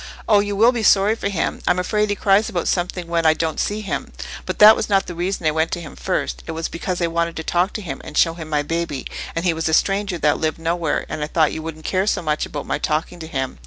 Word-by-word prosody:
"Oh, 210 -2 +5
you 205 0 -1
will 225 +4 +5
be 240 -2 -2
sorry 205 0 +4
for 210 -3 -3
him: 180 -5 -2
I'm - - +3
afraid 210 +3 0
he 205 - +1
cries 200 +2 +3
about 175 - -2
something 180 0 -1
when 170 0 0
I 160 -1 +5
don't 160 -1 -2
see 210 +1 -1
him. 200 - -4 0.4
But - - -3
that 215 +1 +9
was - - -3
not 195 -1 +3
the 175 - -6
reason 175 0 -3
I 155 - +4
went 160 +1 0
to - - -2
him 160 -4 -9
first; - - -2
it - - -4
was 165 0 -3
because 180 +2 -3
I - - +4
wanted 170 0 -1
to 160 - -4
talk 175 +4 +1
to 215 - -5
him 175 - -6
and 150 - -7
show 165 - +4
him 160 -2 -8
my 150 -1 +1
baby, 165 -3 -3 0.3
and 165 +2 -2
he 175 - +3
was 160 0 -1
a 160 - +4
stranger 195 -1 +1
that 150 -2 +2
lived 155 -1 -1
nowhere, 165 -1 -1
and 155 - -4
I - - -2
thought 160 -1 +2
you 160 - -4
wouldn't 155 -1 -8
care 190 +1 0
so 215 - 0
much 155 -1 -1
about 145 - -6
my - - -2
talking 155 +4 -2
to 160 - -7
him. 130 -4 -4
170 Hz, 280 wpm, -21 LUFS, 160-195 Hz, 0.4 s, that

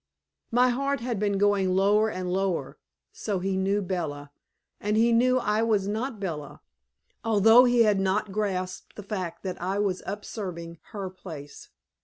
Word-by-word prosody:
'" - - -61
My 250 +2 +4
heart 275 +3 0
had 235 -3 -2
been 205 -1 +1
going 195 -2 +2
lower 205 +3 +3
and 180 -3 -3
lower. 190 -2 -1 0.3
So 205 -3 -3
he 190 +1 -1
knew 195 +2 +1
Bella, 150 -6 -4 0.5
and 210 +1 0
he 230 +1 +4
knew 250 +2 +4
I 215 -3 +1
was 215 -4 +1
not 220 +3 -3
Bella, 155 -7 -5 0.6
although 225 +3 +6
he 240 -1 +5
had 210 -3 +3
not 195 +1 0
grasped 185 -3 -3
the 210 - -8
fact 185 -4 -5
that 185 -3 -5
I 190 +3 -1
was 200 -3 0
usurping 180 -5 -6
her 195 -3 -6
place. 160 -6 -10
200 Hz, 165 wpm, -27 LUFS, 185-220 Hz, 0.6 s, although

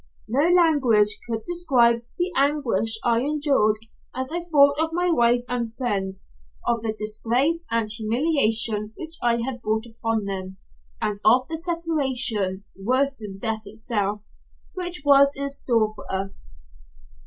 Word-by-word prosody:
No 275 +8 +1
language 265 - +3
could 225 -1 -3
describe 260 -10 +2 0.2
the 360 +1 -1
anguish 260 -7 +1
I 235 -1 +2
endured 275 -6 +1 0.4
as 260 +2 -3
I 345 +1 -2
thought 285 -4 +3
of 320 0 +1
my 355 +1 +1
wife 240 -4 +3
and 245 -2 -2
my - - -9
friends, 200 -6 -3 0.4
of 235 -1 0
the 225 -1 -2
disgrace 245 +10 +1
and 230 -1 0
humiliation 220 -2 +2
which 325 0 -7
I 235 -1 +1
had 250 -2 -5
brought 220 +1 -2
upon 225 -2 -3
them, 190 -1 -6 0.4
and 205 -1 -3
of 250 +4 +4
the 325 - -4
separation, 265 - 0
worse 260 +8 +1
than 210 -5 -9
death 220 +1 -1
itself, 210 -1 -2 0.5
which 350 -4 -4
was 280 0 +5
in 280 0 -1
store 230 -6 0
for - - -10
us. 190 - -5
235 Hz, 145 wpm, -23 LUFS, 215-285 Hz, 0.5 s, was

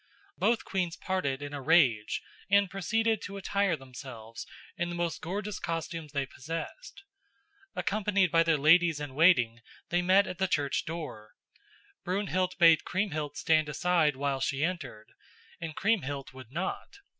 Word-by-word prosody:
Both 235 0 +1
queens 180 -3 -2
parted 145 -8 -2
in 145 0 -6
a 145 - -4
rage 130 -8 +3 0.3
and 200 -2 +4
proceeded 220 +3 0
to 200 0 -7
attire 200 -1 +1
themselves 125 -4 -9 0.3
in 175 0 -2
the 175 - -4
most 170 -1 -2
gorgeous 195 +3 -4
costumes 165 -2 -4
they 140 -2 -1
possessed. 165 - -7 0.7
Accompanied 200 -3 +1
by 165 -1 +5
their 165 -2 +3
ladies 160 +2 +5
in 145 -3 -6
waiting 125 -7 +4 0.3
they 175 0 +2
met 190 +3 +5
at 180 -1 -6
the 190 - +2
church 145 -5 0
door. 150 -10 -7 0.7
Brunhild 185 -1 -1
bade 165 -3 +6
Kriemhild 155 -7 -2
stand 155 -2 +2
aside 155 -1 +2
while 140 0 -1
she 140 +2 -1
entered, 170 -11 -4 0.5
and 160 -2 -6
Kriemhild 145 - -1
would 130 -2 -12
not. 170 +6 -3
165 Hz, 145 wpm, -29 LUFS, 140-185 Hz, 0.7 s, bade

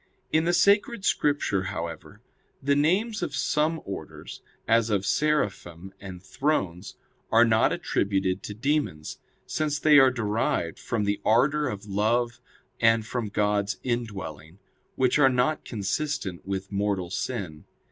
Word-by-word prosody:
In 160 +1 +2
the 175 - +2
Sacred 200 +3 +3
Scripture, 145 -10 +1
however, 85 -4 -6 0.4
the 140 +1 +1
names 200 +10 +1
of - - -3
some 155 +2 0
orders, 90 -5 -8 0.3
as 115 0 +3
of 100 -2 0
Seraphim 95 - -1
and 95 -2 -9
Thrones, 95 - -2 0.4
are 115 +1 +6
not 110 -1 +3
attributed 95 -2 -1
to 105 - -7
demons; 120 - -2 0.3
since 150 -2 -1
they 150 0 +6
are 135 -1 +7
derived 110 -8 -1
from 115 -3 -2
the 100 0 -1
ardor 140 +7 +3
of 105 0 -5
love 115 +4 0 0.4
and 115 -1 +3
from 115 -2 -3
God's 105 -1 0
indwelling, 95 - -4 0.4
which 130 +2 +2
are 135 -2 +6
not 130 +5 +1
consistent 100 - -3
with 95 0 -4
mortal 100 -3 -1
sin. 95 -9 -4
110 Hz, 135 wpm, -26 LUFS, 95-145 Hz, 0.4 s, are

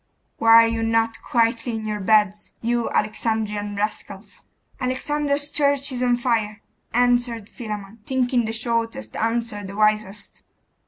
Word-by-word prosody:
Why 225 0 +8
are - - +3
you 230 0 -2
not 225 0 0
quietly 235 -2 0
in 220 -1 -5
your 210 -1 -2
beds, 210 0 +2
you 235 0 0
Alexandrian 210 -1 -1
rascals?' 200 -1 -5 0.4
'Alexander's 285 +3 -1
church 285 -1 +1
is 250 -1 -4
on 245 -1 +3
fire,' 225 -4 -1 0.3
answered 245 -2 +1
Philammon, 215 -3 -7
thinking 250 -2 +1
the 220 - -2
shortest 225 - -2
answer 225 -2 -1
the 195 0 -8
wisest. 215 -1 0
225 Hz, 130 wpm, -23 LUFS, 210-245 Hz, 0.4 s, Why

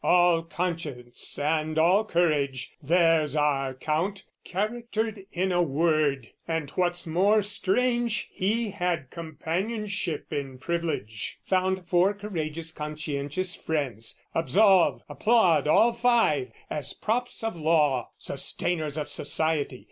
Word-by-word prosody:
"All 175 -2 +4
conscience 165 -8 -4
and 155 +1 0
all 180 +6 +5
courage, 145 - 0
there's 165 -1 +3
our 135 -3 +1
Count 165 +8 -1 0.2
"Charactered 220 0 -3
in 185 +2 0
a 175 0 +3
word; 150 -4 +1 0.2
and, 160 -4 -2
what's 175 +1 0
more 195 +6 +3
strange, 235 +4 0
"He 215 +3 0
had 175 -8 -2
companionship 170 +3 -3
in 135 -2 -4
privilege, 150 -8 -3
"Found 190 0 +1
four 180 +4 +3
courageous 165 -6 -4
conscientious 150 +3 -3
friends: 130 -8 -3
"Absolve, 190 +2 +4
applaud 180 - +3
all 230 +9 +5
five, 230 - +2 0.2
as 145 -2 -3
props 240 +2 -2
of 225 -4 -2
law, 150 -6 +2
"Sustainers 155 -4 -2
of 150 - -3
society! 150 -3 -1
165 Hz, 110 wpm, -27 LUFS, 150-195 Hz, 0.2 s, all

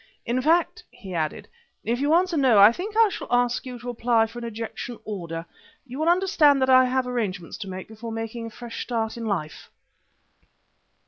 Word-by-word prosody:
"In 245 +2 0
fact," 330 +5 +1
he 195 -5 -10
added, 155 -3 -3 0.4
"if 240 +2 -1
you 290 +3 +3
answer 360 0 +2
no, 260 -7 +4
I 200 +2 +9
think 410 - -6
I 455 -2 +6
shall - - -6
ask 245 +1 +1
you 250 -1 -6
to 240 +1 -7
apply 230 -1 +2
for 230 +2 -9
an 235 - -6
ejection 230 +1 -6
order. 170 -5 -5 0.4
You 260 +2 -8
will 315 +2 +2
understand 345 -6 +4
that 260 - +2
I 255 0 +7
have 255 0 0
arrangements 205 -9 -3
to 200 -3 -6
make 185 0 -7
before 225 +1 -7
taking 225 +1 -5
a - - -7
fresh 235 +1 -8
start 225 -2 -2
in 230 -1 -5
life." 170 -7 -4
240 Hz, 195 wpm, -24 LUFS, 220-260 Hz, 0.4 s, I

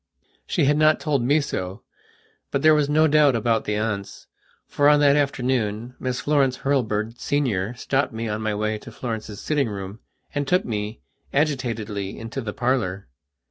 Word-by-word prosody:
She 160 - +1
had 145 +2 +3
not 155 0 +4
told 145 -5 0
me 140 +6 +3
so, 95 -6 -4 0.7
but 140 - -1
there 155 0 +7
was 150 -2 +2
no 155 +2 +4
doubt 150 -3 +4
about 115 0 +1
the 105 - -1
aunts, 105 -2 -3 0.4
for, 145 0 +3
on 150 0 +5
that 140 -1 +5
afternoon, 125 -5 0
Miss 125 -1 -2
Florence 140 -3 +2
Hurlbird, 115 -4 0
Senior, 120 -7 0
stopped 135 +3 0
me 115 0 -4
on 105 0 -3
my 110 -1 -1
way 110 +1 -1
to - - -11
Florence's 110 -4 -5
sitting 145 -5 0
room 100 +1 -6 0.3
and 145 -1 -1
took 180 +6 +2
me, 105 -1 -4 0.3
agitatedly, 115 -9 -1
into 115 +4 -5
the 110 -3 -4
parlour. 105 - -1
125 Hz, 170 wpm, -23 LUFS, 105-145 Hz, 0.7 s, there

